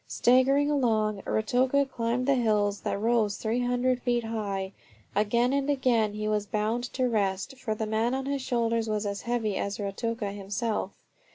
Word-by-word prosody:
Staggering 270 +4 +3
along, 215 -7 +1
Ruatoka 255 +5 +2
climbed 240 0 -1
the 275 - +4
hills 210 -5 +1
that - - -2
rose 220 -2 +1
300 245 +2 0
feet 240 -2 0
high. 200 -4 -3 0.4
Again 235 +5 +2
and 280 0 0
again 245 -6 +2
he 215 0 -3
was 210 -1 0
bound 220 +4 -1
to 255 -1 +1
rest, 200 0 -1
for 220 -4 -2
the 220 - -2
man 220 +3 0
on 265 0 -3
his 280 0 -2
shoulders 230 -2 0
was 215 0 -1
as 200 0 -3
heavy 230 -4 -1
as 200 0 -2
Ruatoka 205 +1 -3
himself. 205 +3 -2
230 Hz, 165 wpm, -28 LUFS, 210-250 Hz, 0.4 s, the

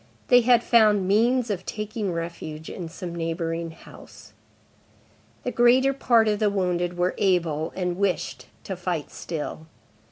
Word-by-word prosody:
They 245 -1 +7
had 240 0 +4
found 210 -5 +4
means 235 +4 +2
of 185 -2 -3
taking 210 -1 -4
refuge 165 -2 -6
in 175 -4 -6
some 175 0 -7
neighboring 165 0 -3
house. 160 - -15 1.1
The 250 - -2
greater 250 +3 +4
part 235 -4 +3
of 210 -1 +1
the 215 -2 +3
wounded 180 -3 -1
were 180 +1 +1
able, 165 -5 +1
and 180 -1 -2
wished, 200 -3 -1 0.2
to 190 - -5
fight 175 -4 -3
still. 160 -1 -6
185 Hz, 140 wpm, -25 LUFS, 170-220 Hz, 1.1 s, They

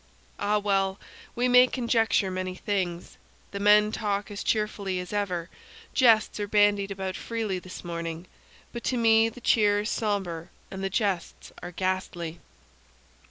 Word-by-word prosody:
Ah, 205 +1 +1
well! 195 -1 0 0.4
we 245 +1 +1
may 250 0 +7
conjecture 225 -6 +1
many 185 0 -3
things. 185 -3 -3 0.3
The 200 - -5
men 210 +1 +5
talk 205 -1 -2
as 205 - -5
cheerfully 205 -3 -1
as 180 +2 -7
ever; 180 -5 -1 0.5
jests 225 -5 +4
are 205 - -2
bandied 205 -1 +3
about 190 -1 -4
freely 220 -5 -3
this 185 +1 -10
morning; 170 0 -5 0.5
but 235 - -6
to 255 - 0
me 225 -1 +4
the 245 +2 -13
cheer 205 -3 +3
is 210 - -3
somber 190 -6 -2 0.2
and 190 0 -6
the 195 - 0
jests 195 -3 -2
are - - -6
ghastly. 180 -2 -3
200 Hz, 150 wpm, -27 LUFS, 185-215 Hz, 0.5 s, may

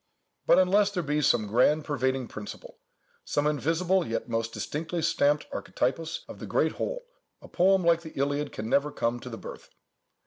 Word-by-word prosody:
But - - +6
unless 195 +2 +4
there 185 -4 -3
be 150 0 0
some 115 -6 +3
grand 130 +8 +3
pervading 130 -3 -1
principle—some 110 +6 -7
invisible, 165 +5 +1
yet 115 - -3
most 115 -1 -2
distinctly 165 +7 -4
stamped 145 0 +2
archetypus 160 +6 -2
of - - -10
the - - -7
great - - +2
whole, - - -4 0.3
a - - -13
poem 190 +1 +3
like 170 0 +4
the 160 -2 -10
Iliad 145 +1 -1
can 110 - -5
never 140 +5 +2
come 120 -2 -1
to 125 - -8
the 115 - -7
birth. - - -10
150 Hz, 170 wpm, -28 LUFS, 125-170 Hz, 0.3 s, But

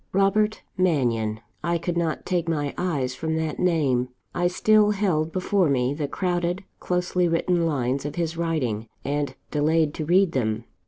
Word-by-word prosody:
"Robert 210 +3 +2 0.2
Mannion!" 115 -11 +1 0.2
I 170 0 +1
could 170 +1 -3
not 165 -2 -1
take 175 -2 0
my 145 -3 -1
eyes 145 -8 -1
from 160 +4 -2
that 160 -1 -2
name: 140 -8 +2 0.2
I 175 0 +1
still 210 +3 +4
held 180 -7 +1
before 185 -1 +1
me 130 -1 +1
the 145 -1 -2
crowded, 175 +3 -1 0.2
closely 180 0 0
written 170 0 +1
lines 135 -3 0
of 145 - -5
his 170 -1 -1
writing, 130 -10 -1 0.2
and 145 -1 -1 0.2
delayed 155 +1 +2
to 155 - -4
read 180 +2 +4
them. 110 -4 -1
165 Hz, 160 wpm, -25 LUFS, 140-180 Hz, 0.2 s, still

